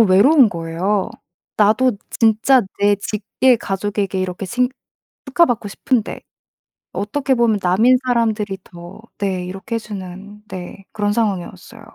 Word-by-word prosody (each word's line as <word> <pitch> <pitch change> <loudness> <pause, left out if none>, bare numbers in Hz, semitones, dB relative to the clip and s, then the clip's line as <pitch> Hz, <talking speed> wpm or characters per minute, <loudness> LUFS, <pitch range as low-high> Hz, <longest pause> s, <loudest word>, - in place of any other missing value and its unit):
외로운 225 +7 +6
거예요. 175 +4 -2 0.5
나도 220 +5 +4 0.2
진짜 225 +3 +3 0.2
내 205 0 +4
직계 220 +5 +1
가족에게 200 -1 -2
이렇게 185 +1 -4
칭 250 +4 +1 0.6
축하받고 260 -6 +2
싶은데 230 +2 -1 0.7
어떻게 265 +6 -1
보면 230 -4 +2
남인 205 +8 +4
사람들이 220 -5 0
더 175 +2 -12 0.2
네 190 -3 -2
이렇게 195 +5 -5
해 - - 0
주는 205 0 -9
네 185 +1 -8
그런 205 -1 -1
상황이었어요. 210 0 -3
205 Hz, 280 characters per minute, -19 LUFS, 190-235 Hz, 0.7 s, 외로운